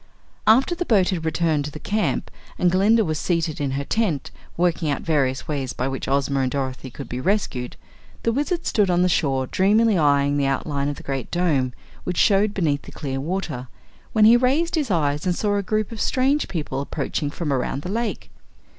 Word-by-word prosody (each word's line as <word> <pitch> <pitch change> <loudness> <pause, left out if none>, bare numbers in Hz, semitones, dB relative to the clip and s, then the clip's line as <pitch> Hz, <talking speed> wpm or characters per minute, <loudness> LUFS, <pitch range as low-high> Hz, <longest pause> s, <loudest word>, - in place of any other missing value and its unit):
After 255 +10 +5
the 345 - -2
boat 205 - +3
had 170 -4 -2
returned 160 -2 +1
to - - -4
the 155 - -8
camp 210 +6 -1 0.3
and 180 - +3
Glinda 210 +4 +4
was 155 -2 -2
seated 165 -4 -1
in 140 - 0
her 140 - -2
tent, 175 - -1 0.3
working 170 -2 +1
out 140 - -2
various 135 -5 0
ways 140 -4 -2
by 130 - -2
which 135 0 -4
Ozma 140 0 +1
and 130 -1 +1
Dorothy 130 -1 -4
could 135 +1 -9
be 125 +2 -4
rescued, 140 - -1 0.5
the 230 - +2
Wizard 295 +8 -1
stood 205 -3 +2
on 175 0 +3
the - - +4
shore 135 -6 +1
dreamily 210 - +3
eying 145 -2 +3
the 140 -1 +1
outlines 140 +1 -1
of 145 - -3
the - - -11
Great 135 -2 -4
Dome 150 -8 +1 0.3
which 180 -1 -3
showed 200 +1 +3
beneath 150 -7 +1
the - - -12
clear 135 -3 -4
water, 150 -5 -3 0.4
when 215 -1 +4
he 230 +2 +8
raised 275 +8 +2
his 300 -7 0
eyes 150 -2 0
and 180 - +2
saw 205 +1 0
a 200 - +1
group 215 +2 -1
of 225 - -5
strange 275 +3 +1
people 150 -6 -3
approaching 145 +1 -3
from 150 -1 -2
around 135 +2 -2
the 180 - -4
lake. 230 +1 -3
165 Hz, 205 wpm, -23 LUFS, 140-210 Hz, 0.5 s, he